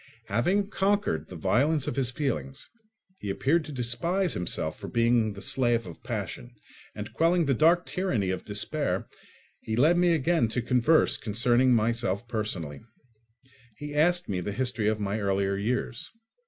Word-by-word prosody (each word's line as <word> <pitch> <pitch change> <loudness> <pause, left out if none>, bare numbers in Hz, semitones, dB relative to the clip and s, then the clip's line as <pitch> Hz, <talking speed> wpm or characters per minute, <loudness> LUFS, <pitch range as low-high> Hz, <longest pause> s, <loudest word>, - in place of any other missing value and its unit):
Having 190 - +1
conquered 190 - 0
the 90 - -10
violence 130 - +1
of - - -2
his 135 -3 +1
feelings, 120 - -3 0.5
he 100 - -5
appeared 135 +13 +1
to 150 - -8
despise 150 +9 0
himself 90 -1 -2
for - - -7
being 115 -2 +2
the 100 0 -8
slave 120 0 +1
of 85 -3 -10
passion; - - -5 0.4
and 105 0 -7
quelling 170 +1 +2
the 140 - +2
dark 165 +6 +4
tyranny 125 - -1
of 95 - -4
despair, 105 - -2 0.5
he 110 - -4
led 155 +9 +4
me 175 -1 +4
again 160 -4 +2
to 120 +3 -2
converse 125 +6 +3
concerning 120 +4 +2
myself 115 -1 0
personally. 90 -11 -4 1.0
He 145 0 -7
asked 175 +4 +2
me 95 -3 -2
the 100 +3 -4
history 125 -3 -1
of 110 0 +1
my 100 +1 -2
earlier 100 -1 0
years. 115 +3 -2
120 Hz, 155 wpm, -27 LUFS, 100-155 Hz, 1.0 s, dark